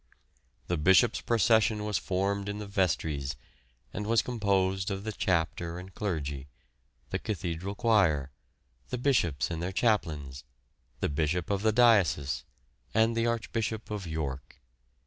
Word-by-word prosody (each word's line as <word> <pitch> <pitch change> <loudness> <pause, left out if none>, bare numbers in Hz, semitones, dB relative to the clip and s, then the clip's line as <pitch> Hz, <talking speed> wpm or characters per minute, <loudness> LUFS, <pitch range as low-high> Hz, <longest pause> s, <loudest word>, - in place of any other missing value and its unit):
The 90 - -1
Bishops' 85 +4 +4
procession 110 -2 +3
was 105 -4 0
formed 100 +2 -1
in 100 - -3
the 105 - -5
vestries, 80 -7 -1 0.6
and 105 - -4
was 115 0 +3
composed 95 -5 0
of 100 0 -3
the 110 - -3
Chapter 85 -3 -1
and 95 +1 -9
Clergy, 75 -9 -3 0.6
the - - -1
Cathedral 95 -1 -4
Choir, 85 - +2 0.6
the - - -2
Bishops 115 - +1
and 80 -1 -3
their 90 +2 -2
Chaplains, 75 - 0 0.6
the - - +1
Bishop 80 +5 -1
of 100 -1 0
the 110 +1 +3
Diocese, 100 - +3 0.5
and 115 +1 +3
the 115 0 +1
Archbishop 115 -1 -2
of 100 -4 -4
York. 70 -5 -5
95 Hz, 135 wpm, -29 LUFS, 80-105 Hz, 0.6 s, Bishops